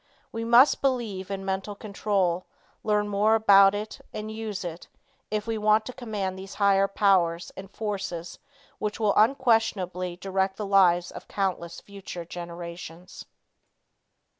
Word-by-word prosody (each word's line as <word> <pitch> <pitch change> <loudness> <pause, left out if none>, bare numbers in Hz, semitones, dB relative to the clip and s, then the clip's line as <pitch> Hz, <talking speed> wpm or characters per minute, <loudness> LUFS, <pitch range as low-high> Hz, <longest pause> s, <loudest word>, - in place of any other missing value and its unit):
We 225 0 -4
must 240 +5 +5
believe 230 -8 -1
in 195 -1 -4
mental 195 +2 -3
control, 200 -4 -1 0.4
learn 210 -1 +1
more 205 +2 +3
about 200 -2 +6
it, 210 +1 -6
and 215 0 -6
use 220 -3 -5
it, 170 -1 -7 0.4
if 210 0 -2
we 225 -1 -2
want 215 +1 +3
to 255 - -6
command 205 -7 -4
these 195 +1 -9
higher 195 -1 +3
powers 180 -4 +2
and 190 0 -9
forces 195 -5 -5 0.4
which 210 +1 -3
will 210 -2 +2
unquestionably 215 -7 +1
direct 190 +1 -1
the 210 - -3
lives 180 -3 +4
of - - -10
countless 180 -3 -3
future 195 -4 -8
generations. 170 0 -8
195 Hz, 140 wpm, -26 LUFS, 185-215 Hz, 0.4 s, about